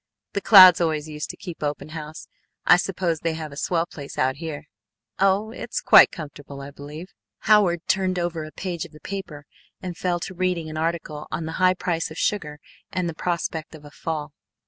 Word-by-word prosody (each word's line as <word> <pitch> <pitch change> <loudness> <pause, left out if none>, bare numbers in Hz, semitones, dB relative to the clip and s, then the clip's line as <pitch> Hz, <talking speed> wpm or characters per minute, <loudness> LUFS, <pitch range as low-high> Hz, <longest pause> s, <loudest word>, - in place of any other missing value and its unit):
The 200 - -1
Clouds 185 -3 +9
always 155 -2 0
used 150 -1 -6
to - - -7
keep 175 -4 -8
open 145 0 -3
house. 155 0 -8 0.4
I 180 - +7
suppose 180 -3 -1
they 165 0 -1
have 155 -2 -6
a - - -10
swell 165 +3 0
place 145 -5 -10
out 130 +1 +1
here?" 160 -2 -6 0.6
"Oh, 195 +3 +2
it's - - -4
quite - - +8
comfortable, 145 -3 -9
I 140 +1 -8
believe," 150 +5 -10 0.3
Howard 195 -5 +3
turned 190 -1 +1
over 170 -2 -2
a 155 - -9
page 175 -3 -4
of - - -11
the 150 - -13
paper 155 -5 -7 0.3
and 180 -2 -6
fell 175 0 -1
to 190 - -5
reading 180 -3 -1
an 155 - -6
article 160 -2 -3
on 165 - -3
the 160 - -4
high 185 0 +5
price 175 -3 -2
of 160 - -10
sugar 150 -8 -1 0.3
and 185 -3 -1
the 165 - -3
prospect 165 -1 -3
of 150 -1 -14
a 145 - -12
fall. 150 +1 -5
165 Hz, 200 wpm, -24 LUFS, 150-180 Hz, 0.6 s, Clouds